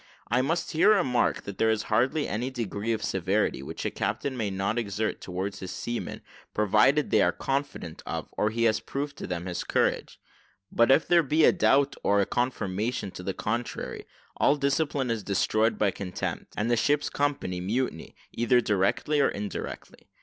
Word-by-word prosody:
I 125 +2 +4
must 165 +6 -1
here 195 +7 +5
remark, 130 -11 +1
that 100 -1 -8
there 110 - +3
is 110 -1 +1
hardly 130 +9 +1
any 120 +5 -2
degree 115 -3 -3
of 110 - -1
severity, 95 -3 0
which 70 - -6
a - - 0
captain 140 -2 -2
may 110 -4 -1
not 100 +4 -1
exert 110 0 -2
towards 95 +2 -4
his 95 - -6
seamen 120 +5 -4 0.3
provided 105 +8 +3
they - - +5
are - - +4
confident 135 - -3
of, - - -3
or 105 - 0
he 115 +2 -1
has 110 -2 +3
proved 140 +1 -4
to - - -6
them 90 -1 -4
his 90 -2 -3
courage: - - 0 0.5
but 115 +1 +3
if 135 +4 +5
there 175 -1 +5
be 155 +1 +2
a - - +7
doubt, 140 -6 +3
or 100 0 +3
a 100 - +3
confirmation 110 -3 -2
to - - -8
the 95 +1 -4
contrary, 115 +3 -4 0.3
all 140 - +4
discipline 140 -2 0
is 115 -2 -1
destroyed 110 +3 +1
by 100 -2 +2
contempt, 95 -2 -5
and 110 +3 0
the - - +5
ship's 145 +5 +1
company 140 -11 -1
mutiny, 105 -3 -2 0.2
either 120 +1 +3
directly 105 +8 +1
or 140 - +4
indirectly. 100 0 -6
115 Hz, 180 wpm, -27 LUFS, 100-135 Hz, 0.5 s, a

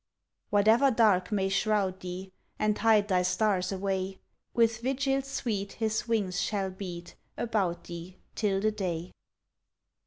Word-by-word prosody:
Whatever 220 +6 +5
dark 215 -6 +3
may 195 -2 +1
shroud 195 -1 +1
thee 185 +1 -6 0.3
And 215 0 +1
hide 215 -2 +4
thy 185 -3 +3
stars 185 0 +1
away, 190 0 -2 0.3
With 230 -1 +2
vigil 270 +2 +1
sweet 225 -7 -3
his 220 0 -1
wings 200 -5 0
shall 195 -3 -1
beat 175 -2 -7 0.2
About 200 -7 -1
thee 175 +2 -9 0.2
till 195 -3 0
the 215 +1 +2
day. 180 -5 -3
200 Hz, 130 wpm, -29 LUFS, 185-220 Hz, 0.3 s, Whatever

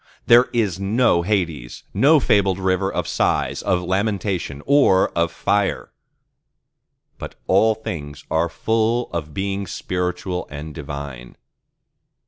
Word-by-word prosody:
There 120 +2 +7
is 105 -7 0
no 100 -2 +2
Hades, 85 - -2
no 150 +3 +5
fabled 100 -6 +2
rivers 95 0 0
of - - -1
Sighs, - - 0
of 90 -1 0
Lamentation, 95 -6 -2
or 140 -10 +4
of 85 0 0
Fire: 100 +3 -1 1.3
but - - -8
all 110 +4 +3
things 75 -9 -7
are 80 +1 +1
full 115 +6 0
of 75 -3 -5
Beings 100 0 -3
spiritual 90 0 -3
and 75 +1 -7
divine. 70 -5 -7
95 Hz, 115 wpm, -21 LUFS, 85-105 Hz, 1.3 s, There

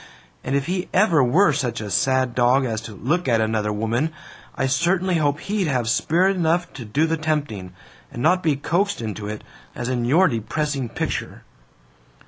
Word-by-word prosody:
And 135 - -1
if 140 -1 0
he 180 +1 -2
ever 175 -8 +4
were 155 +7 +4
such 125 -5 -2
a 105 -2 -6
sad 130 +4 +1
dog 125 +2 +3
as 110 -3 -2
to 110 -2 -9
look 155 - -1
at 115 -3 +3
another 110 -1 0
woman, 115 +8 -1 0.4
I 135 - 0
certainly 175 +7 +1
hope 145 -1 0
he'd 200 -3 -1
have 125 -5 0
spirit 180 +11 +2
enough 175 0 0
to 120 - -8
do 140 +9 +1
the 165 0 0
tempting, 145 -12 -2 0.4
and 120 - -5
not 180 0 +3
be 155 -4 +1
coaxed 180 +8 0
into 105 -2 -5
it, 105 0 -6 0.3
as 120 - -4
in 125 -2 -1
your 165 +10 +4
depressing 135 +2 -2
picture!" - - -4
135 Hz, 180 wpm, -22 LUFS, 115-165 Hz, 0.4 s, ever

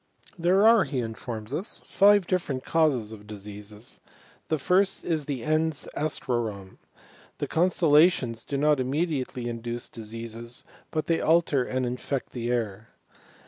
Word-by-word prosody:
There 185 +4 +3
are, 225 -2 +7
he 135 - -2
informs 115 0 -5
us, 180 +7 -2
five 205 -1 +5
different 150 -9 -1
causes 140 -10 +2
of 105 -1 -11
diseases. 105 +1 -9 0.5
The 155 - +1
first 185 +6 +2
is 160 -4 0
the 135 -5 -3
ens 155 -1 0
astrorum. 120 -10 -3 0.6
The - - -3
constel^ 170 -1 +2
lations 145 -8 +4
do 140 - -3
not 150 0 +3
immediately 130 -2 -1
induce 120 0 -5
diseases, 115 +1 -6 0.2
but 155 -1 -2
they 165 - +1
aher 160 -4 +3
and 130 0 0
infect 125 +2 -3
the 120 -1 -3
air. 115 -3 -2
130 Hz, 140 wpm, -27 LUFS, 115-160 Hz, 0.6 s, are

